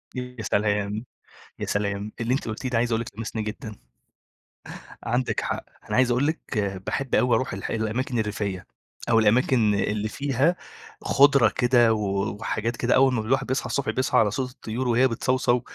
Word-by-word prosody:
ي -, -, -2 dB, 0.2 s
يا -, -, -4 dB
سلام! 105 Hz, +2 st, 0 dB, 0.5 s
يا -, -, -4 dB
سلام! 100 Hz, +1 st, -2 dB
اللي 115 Hz, +2 st, 0 dB
أنتِ 135 Hz, -, -2 dB
قُلتيه 110 Hz, +4 st, -4 dB
ده 120 Hz, -2 st, +1 dB
عايز 120 Hz, 0 st, 0 dB
أقول 115 Hz, -, +1 dB
لِك 115 Hz, -, -5 dB
لمسني 110 Hz, 0 st, -3 dB
جدًا. 105 Hz, 0 st, -6 dB, 1.3 s
عندِك 120 Hz, +2 st, 0 dB
حق. -, -, -3 dB, 0.3 s
أنا -, -, -1 dB
عايز 125 Hz, -1 st, +4 dB
أقول 130 Hz, +5 st, +2 dB
لِك 160 Hz, -, -1 dB, 0.5 s
باحب 135 Hz, -2 st, -1 dB
أوي 125 Hz, +2 st, +3 dB
أروح 130 Hz, -, -1 dB
الح 95 Hz, -, -5 dB
الأماكن 115 Hz, +2 st, -1 dB
الريفية، 105 Hz, -4 st, -3 dB, 0.4 s
أو 115 Hz, -1 st, +5 dB
الأماكن 110 Hz, -1 st, +3 dB
اللي 105 Hz, +1 st, -1 dB
فيها 140 Hz, +7 st, +1 dB, 0.5 s
خُضرة 140 Hz, -5 st, +5 dB
كده 120 Hz, -2 st, +3 dB
و 100 Hz, 0 st, -1 dB
وحاجات 115 Hz, +1 st, -2 dB
كده 120 Hz, 0 st, +2 dB
أول 130 Hz, 0 st, +5 dB
ما 115 Hz, -, 0 dB
الواحد 135 Hz, +4 st, 0 dB
بيصحى 130 Hz, -1 st, -1 dB
الصبح 125 Hz, 0 st, -1 dB
بيصحى 130 Hz, +4 st, +1 dB
على 105 Hz, -3 st, +4 dB
صوت 125 Hz, +2 st, -3 dB
الطيور 125 Hz, +1 st, -4 dB
وهي 120 Hz, +2 st, +4 dB
بتصَوصَو. 125 Hz, 0 st, +1 dB
115 Hz, 175 wpm, -25 LUFS, 110-130 Hz, 1.3 s, أو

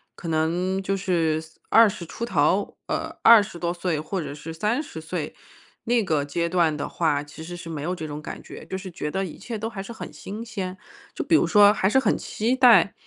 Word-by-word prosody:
可 170 Hz, -, -8 dB
能 175 Hz, +4 st, 0 dB
就 195 Hz, +1 st, -1 dB
是 165 Hz, -5 st, 0 dB, 0.3 s
20 215 Hz, -6 st, +5 dB
出 230 Hz, +7 st, -5 dB
头 190 Hz, 0 st, +1 dB
呃， -, -, -3 dB
20 215 Hz, -6 st, +6 dB
多 170 Hz, 0 st, -1 dB
岁， 175 Hz, -3 st, -2 dB
或 180 Hz, +5 st, -3 dB
者 150 Hz, -, -5 dB
是 150 Hz, +2 st, -8 dB
30 210 Hz, -, -2 dB
岁 160 Hz, -1 st, -5 dB, 0.5 s
那 235 Hz, -1 st, +2 dB
个 150 Hz, -5 st, 0 dB
阶 170 Hz, +4 st, -1 dB
段 170 Hz, -4 st, +2 dB
的 145 Hz, -, -4 dB
话， 150 Hz, -4 st, 0 dB
其 145 Hz, +2 st, -11 dB
实 175 Hz, +2 st, -7 dB
是 170 Hz, -1 st, -8 dB
没 150 Hz, -3 st, -5 dB
有 180 Hz, +3 st, -1 dB
这 160 Hz, -3 st, -5 dB
种 150 Hz, 0 st, -6 dB
感 -, -, -7 dB
觉， -, -, -11 dB
就 190 Hz, -, -5 dB
是 190 Hz, 0 st, -6 dB
觉 150 Hz, -3 st, -4 dB
得 195 Hz, +3 st, -1 dB
一 175 Hz, -, -7 dB
切 230 Hz, -3 st, -6 dB
都 225 Hz, +1 st, -3 dB
还 195 Hz, -3 st, -6 dB
是 235 Hz, -, -8 dB
很 -, -, -8 dB
新 200 Hz, +9 st, -7 dB
鲜。 190 Hz, -5 st, -5 dB, 0.3 s
就 -, -, -3 dB
比 325 Hz, -, +3 dB
如 -, -, +4 dB
说， 205 Hz, -1 st, +7 dB
还 190 Hz, -2 st, +1 dB
是 265 Hz, -, +4 dB
很 -, -, +1 dB
期 235 Hz, +4 st, -1 dB
待， 240 Hz, -7 st, +6 dB
180 Hz, 225 characters per minute, -24 LUFS, 160-210 Hz, 0.5 s, 说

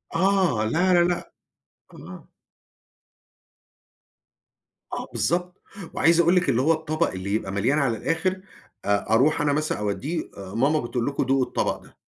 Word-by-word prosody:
آه 185 Hz, -, +2 dB
لا 175 Hz, +11 st, +2 dB
لا 175 Hz, -1 st, +5 dB
لأ 175 Hz, 0 st, -2 dB, 0.6 s
آه. -, -, -12 dB, 2.6 s
آه -, -, -3 dB
بالضبط 180 Hz, +1 st, -1 dB, 0.3 s
وعايز 165 Hz, +1 st, +3 dB
أقول 170 Hz, +2 st, +4 dB
لِك 180 Hz, 0 st, +2 dB
اللي 120 Hz, -, +2 dB
هو 160 Hz, +5 st, +4 dB
الطبق 155 Hz, +1 st, -1 dB
اللي 95 Hz, +2 st, -4 dB
يبقى 105 Hz, -3 st, -2 dB
مليان 115 Hz, +10 st, +1 dB
على 125 Hz, -6 st, 0 dB
الآخر 185 Hz, -, -1 dB, 0.4 s
أ 100 Hz, 0 st, 0 dB
أروح 145 Hz, +7 st, +3 dB
أنا 145 Hz, -1 st, +2 dB
مثلًا 155 Hz, -3 st, -1 dB
أودّيه 130 Hz, +11 st, -3 dB
أ 95 Hz, -1 st, -9 dB
ماما 145 Hz, +6 st, +2 dB
بتقول 120 Hz, -1 st, -3 dB
لكم 140 Hz, 0 st, 0 dB
دوقوا 135 Hz, 0 st, +2 dB
الطبق -, -, -1 dB
ده. -, -, -20 dB
150 Hz, 150 wpm, -24 LUFS, 115-170 Hz, 2.6 s, لا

